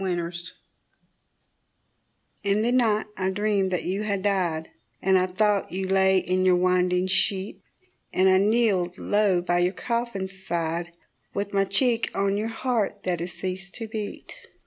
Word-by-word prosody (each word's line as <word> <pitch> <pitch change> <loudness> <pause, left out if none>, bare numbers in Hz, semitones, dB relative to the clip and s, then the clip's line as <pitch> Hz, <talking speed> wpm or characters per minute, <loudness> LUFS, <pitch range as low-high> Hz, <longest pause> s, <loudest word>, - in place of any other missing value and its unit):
A 185 -2 0
DREAM 170 -1 -3 2.1
In 200 +1 +1
the 240 - +1
night 225 -4 +2
I 190 0 -1
dreamed 200 0 +1
that 180 -2 -1
you 195 +3 -2
had 200 -3 -2
died, 175 -6 0 0.3
And 190 0 +2
I 185 0 +3
thought 205 +2 +1
you 190 +1 -3
lay 190 0 +4
in 185 0 0
your 185 -1 +5
winding 180 0 +2
sheet; 195 +1 0 0.5
And 185 +1 +3
I 190 0 +5
kneeled 200 -4 +2
low 205 -4 +2
by 175 0 +1
your 180 +2 +2
coffin 235 -5 -2
side, 175 -3 -3 0.4
With 200 0 -3
my 195 0 +3
cheek 230 +4 +2
on 195 0 +1
your 210 +2 -1
heart 225 -3 -2
that 180 -2 -1
had 170 +2 -4
ceased 185 +1 -6
to 225 -2 -6
beat. 215 -1 -6
190 Hz, 160 wpm, -25 LUFS, 185-210 Hz, 2.1 s, your